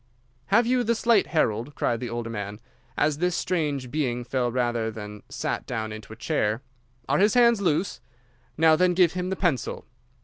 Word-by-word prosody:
"'Have 225 +4 +4
you 250 +1 +2
the 235 0 +1
slate, 225 -2 +3
Harold?' 125 -3 0
cried 120 -1 0
the 120 - -4
older 115 0 -4
man, 105 -1 -5 0.4
as 150 0 +1
this 180 0 +1
strange 145 -8 -1
being 125 -5 -1
fell 125 -1 -1
rather 120 -2 0
than 105 -1 -8
sat - - -3
down 110 0 -3
into 110 0 -9
a - - -7
chair. 115 -2 -1 0.4
'Are - - +2
his 205 +3 +4
hands 235 -3 +5
loose? 175 0 0 0.6
Now, 160 0 +6
then, 180 +2 +2
give 180 -3 +4
him 180 0 -2
the 190 - -1
pencil. 170 - -1
145 Hz, 180 wpm, -25 LUFS, 115-180 Hz, 0.6 s, Now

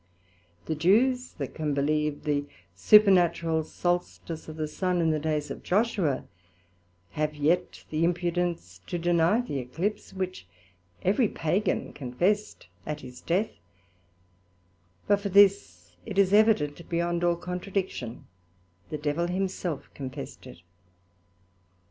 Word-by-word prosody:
The - - -1
Jews, 240 - +2
that 140 -3 -5
can 150 -3 -2
believe 150 +1 0
the 145 -1 0 0.3
supernatural 170 - +5
Solstice 175 -1 -3
of 155 - -7
the 155 -1 -2
Sun 180 +3 -1
in 165 -1 +3
the 155 - 0
days 150 -1 -2
of - - -6
Joshua, 195 - +1 0.9
have 150 0 -2
yet 165 +5 0
the 155 +1 0
impudence 170 - -1
to 175 - -2
deny 175 +5 +3
the 145 - -4
Eclipse, 160 - -3
which 185 - -5 0.6
every 210 +5 +3
Pagan 180 +3 -1
confessed, 175 +11 -1 0.2
at 150 -1 -5
his 125 -1 -11
death: 190 +6 0 1.5
but 205 - +3
for 200 0 -3
this, 180 - +3
it 195 - -7
is 200 -1 +4
evident 190 -8 +3
beyond 170 0 0
all 175 0 +3
contradiction, 180 - -4 0.6
the 155 - -3
Devil 150 +3 -1
himself 180 -4 -3
confessed 135 -1 -7
it. 90 -8 -13
170 Hz, 125 wpm, -27 LUFS, 150-190 Hz, 1.5 s, supernatural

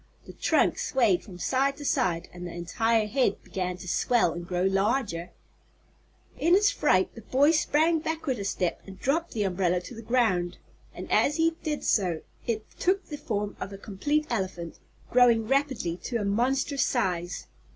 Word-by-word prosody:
The - - -11
trunk - - +2
swayed 225 -9 +2
from 185 -4 -11
side 270 +8 +1
to 290 - -8
side 175 -8 0
and 175 0 -7
the - - -7
entire 220 +6 +1
head 255 +4 0
began 180 -1 -3
to 180 - -10
swell 220 +1 +2
and 175 0 -7
grow 180 -1 -1
larger. 195 -2 0 1.1
In 340 +3 +4
his 410 +1 +4
fright 185 -10 +2
the 230 - -10
boy 275 +7 +3
sprang 320 +1 +2
backward 315 -6 -2
a - - -3
step 185 -3 -1
and 190 -1 -10
dropped 325 +8 0
the 215 - 0
umbrella 180 -2 +1
to 215 - -10
the 225 - -8
ground, 215 -7 +1 0.3
and - - -8
as 295 - +3
he 330 0 +3
did 300 -2 -3
so 180 -6 +1 0.3
it 220 -2 -1
took 385 +2 +1
the 300 - -4
form 210 -5 -3
of 200 - -5
a 195 - -7
complete 290 +11 -1
elephant, 185 -6 -3 0.3
growing 235 -3 +5
rapidly 265 - 0
to 240 - -1
a 210 - -2
monstrous 260 +7 +1
size. 180 -7 -1
220 Hz, 175 wpm, -27 LUFS, 185-275 Hz, 1.1 s, growing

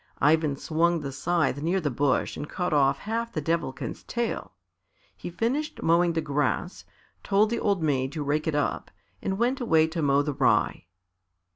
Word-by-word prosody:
Ivan 155 -1 +3
swung 165 +3 +1
the 140 -2 -5
scythe 145 -1 0
near 175 +5 +1
the 150 -5 -1
bush 135 +2 0
and 150 - -6
cut 180 -3 -2
off 140 -2 +3
half 230 +2 -3
the 160 - -2
Devilkin's 160 -3 -3
tail. 235 -1 -3 0.6
He - - -7
finished 245 - -2
mowing 170 +1 +3
the 165 - 0
grass, 150 +4 -2 0.4
told 205 +2 +2
the 235 - 0
old 200 -5 0
maid 135 -3 0
to 155 -3 -3
rake 150 +2 -1
it 155 - 0
up 145 - -1 0.3
and 190 0 -2
went 250 +4 0
away 160 -9 +4
to 160 +1 -3
mow 140 -1 +3
the 150 0 -2
rye. 130 -9 +1
160 Hz, 175 wpm, -26 LUFS, 145-190 Hz, 0.6 s, away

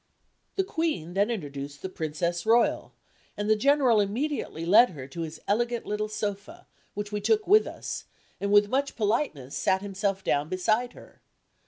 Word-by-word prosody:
The 385 - +2
Queen 320 - -2
then 200 +3 +2
introduced 145 -9 -5
the - - -2
Princess 170 0 -2
Royal, 230 +2 +2 0.5
and 205 - -2
the 215 - +5
General 260 -1 +4
immediately 210 - -2
led 220 +8 +7
her 135 -7 -9
to 155 +5 -7
his 160 -1 -6
elegant 235 +3 0
little 210 +1 -2
sofa, 205 -2 -5 0.3
which 205 0 -4
we 210 0 -2
took 430 - +2
with 425 +3 +5
us, - - -6 0.3
and 200 0 -1
with 205 0 +6
much 275 +5 -1
politeness 210 - -1
sat 190 +1 +1
himself 195 -1 -2
down 145 +2 0
beside 215 +7 0
her. - - -16
205 Hz, 165 wpm, -27 LUFS, 175-235 Hz, 0.5 s, led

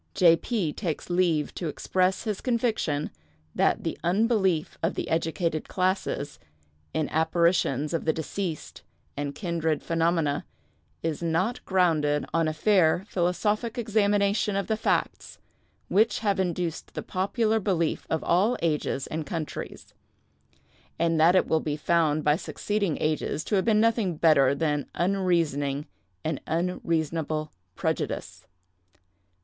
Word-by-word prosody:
"J. 170 -3 +6
P. 175 -4 -2
takes 175 -2 -4
leave 170 -4 +1
to 170 - -4
express 185 +5 0
his 215 -4 -3
conviction 225 - 0 0.4
that - - +1
the - - -3
unbelief 190 -3 +1
of 165 +3 0
the - - -3
educated 165 0 -1
classes 185 -5 -1 0.5
in 155 - -1
apparitions 160 -3 +1
of 165 - -1
the 160 - +4
deceased 165 +1 -5 0.3
and 145 0 -4
kindred 165 -5 -1
phenomena 165 -3 +1 0.6
is 160 -1 -2
not 170 +8 0
grounded 155 -6 +2
on 165 -1 +2
a - - +1
fair 175 0 +3
philosophic 210 +6 0
examination 205 -2 +1
of 200 - 0
the 220 - 0
facts, 215 - -1 0.5
which 220 +4 +3
have 200 -3 +1
induced 175 -3 -2
the - - -4
popular 215 +4 0
belief 180 -6 -1
of 160 - -1
all 205 +8 +2
ages 150 -4 0
and 155 -2 -4
countries; 160 -1 -6 1.0
and 165 -1 +1
that 170 +4 +6
it 185 - +4
will 160 - +2
be 150 -1 -3
found 155 -1 +2
by 150 0 +4
succeeding 200 0 -2
ages 155 0 -1
to - - -5
have 190 -2 +2
been 220 -2 +4
nothing 225 -5 +2
better 140 -4 +4
than 150 -2 -1
unreasoning 165 -7 0 0.4
and 155 -3 -2
unreasonable 160 -3 -1 0.2
prejudice. - - -3
170 Hz, 130 wpm, -26 LUFS, 155-195 Hz, 1.0 s, J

